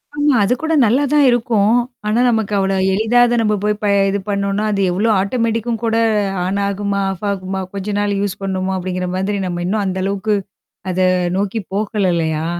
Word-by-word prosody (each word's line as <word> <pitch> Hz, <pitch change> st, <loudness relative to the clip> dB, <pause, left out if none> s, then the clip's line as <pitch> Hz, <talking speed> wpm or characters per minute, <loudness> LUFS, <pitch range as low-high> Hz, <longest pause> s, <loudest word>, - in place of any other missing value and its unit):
ஆமா, 290 Hz, 0 st, +2 dB
அது 210 Hz, -, +2 dB
கூட 320 Hz, 0 st, -1 dB
நல்லா 245 Hz, +6 st, +3 dB
தான் 295 Hz, -1 st, +5 dB
இருக்கும். 225 Hz, -3 st, +2 dB, 0.3 s
ஆனா, 220 Hz, +3 st, +1 dB
நமக்கு 220 Hz, -3 st, 0 dB
அவ்ளோ 195 Hz, 0 st, +1 dB, 0.2 s
எளிதா 220 Hz, +4 st, +2 dB
அத 240 Hz, 0 st, +1 dB
நம்ம 210 Hz, -1 st, +1 dB
போய் 210 Hz, 0 st, +1 dB
ப -, -, +1 dB, 0.2 s
இது 200 Hz, +1 st, -1 dB
பண்ணோனா, 200 Hz, +1 st, -1 dB
அது 200 Hz, -1 st, 0 dB
எவ்வளோ 210 Hz, +6 st, 0 dB
ஆட்டோமேட்டிக்கும் 230 Hz, +1 st, -1 dB
கூட 225 Hz, -1 st, +1 dB, 0.5 s
ஆன் 195 Hz, +2 st, -1 dB
ஆகுமா? 200 Hz, 0 st, -2 dB
ஆஃப் 190 Hz, +3 st, -8 dB
ஆகுமா? 190 Hz, 0 st, -4 dB
கொஞ்ச 200 Hz, +1 st, -5 dB
நாள் 205 Hz, 0 st, 0 dB
யூஸ் 205 Hz, -2 st, -3 dB
பண்ணணுமா? 190 Hz, 0 st, -2 dB
அப்படிங்கிற 180 Hz, 0 st, -3 dB
மாதிரி 200 Hz, +2 st, -1 dB
நம்ம 175 Hz, -1 st, -3 dB
இன்னும் 205 Hz, +3 st, 0 dB
அந்த 190 Hz, 0 st, -2 dB
அளவுக்கு 200 Hz, +2 st, 0 dB, 0.6 s
அத 185 Hz, -, -3 dB, 0.4 s
நோக்கி 205 Hz, +3 st, -1 dB
போகல 205 Hz, -2 st, 0 dB
இல்லையா? 160 Hz, -1 st, -1 dB
200 Hz, 180 wpm, -18 LUFS, 190-225 Hz, 0.6 s, தான்